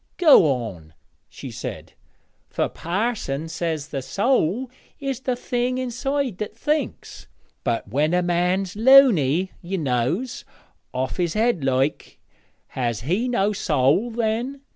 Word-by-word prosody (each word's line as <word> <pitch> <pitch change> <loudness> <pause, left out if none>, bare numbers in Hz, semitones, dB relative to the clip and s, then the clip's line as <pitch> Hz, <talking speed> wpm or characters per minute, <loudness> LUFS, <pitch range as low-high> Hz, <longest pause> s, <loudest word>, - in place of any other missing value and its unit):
'Go 310 - +7
on,' 90 -11 -5 0.3
she - - -9
said, - - -7 0.6
'for - - 0
parson 175 - -2
says 160 -2 -3
the 135 - -3
soäl 215 - 0 0.3
is 275 -3 -3
the 260 -1 -1
thing 245 0 -1
inside 255 -2 -2
that 210 +1 -5
thinks; 300 +5 -3 0.4
but 120 -4 -1
when 145 +9 +1
a 180 - +2
man's 180 +2 0
luny, 205 - +5
ye 190 +2 -3
knows 150 - -1 0.5
off 130 +1 -3
his 175 -1 -1
head 220 - +1
like 135 +2 -1 0.5
has 120 -4 -2
he 185 - 0
no 210 -4 +1
soäl 170 - +1
then? 235 +4 -1
185 Hz, 125 wpm, -23 LUFS, -, 0.6 s, Go